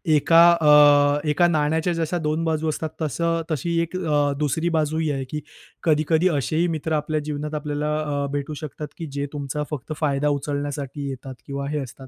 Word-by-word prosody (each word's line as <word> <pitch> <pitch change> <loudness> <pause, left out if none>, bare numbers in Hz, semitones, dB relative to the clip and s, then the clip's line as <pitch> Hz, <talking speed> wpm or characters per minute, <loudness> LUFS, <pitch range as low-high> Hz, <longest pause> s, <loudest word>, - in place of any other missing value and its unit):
एका 165 +3 +5 0.2
अ, 145 0 +5
एका 175 +4 +3
अ, - - +5
नाण्याच्या 160 +1 +1
जशा 165 +1 -1
दोन 155 +2 0
बाजू 160 -1 0
असतात 155 +1 -3
तसं, 165 +2 0
तशी 170 +3 -1
एक 170 +2 -4
अ, 145 -5 +1
दुसरी 160 +4 0
बाजू 155 0 0
ही 160 -1 0
आहे 135 -1 -2
की 150 - -3 0.4
कधी-कधी 160 +2 +2
असेही 160 +3 0
मित्र 160 +1 -3
आपल्या 155 +1 -1
जीवनात 150 +1 -4
आपल्याला 150 0 -2
अ, 145 -2 -2
भेटू 145 +1 -3
शकतात 150 0 -6
की 165 - -5
जे 140 0 -1
तुमचा 145 0 -3
फक्त 150 +1 -4
फायदा 145 -1 +1
उचलण्यासाठी 145 0 -4
येतात 130 0 -7
किंवा 140 0 -4
हे 150 0 -1
असतात. 130 0 -8
150 Hz, 185 wpm, -23 LUFS, 145-160 Hz, 0.4 s, एका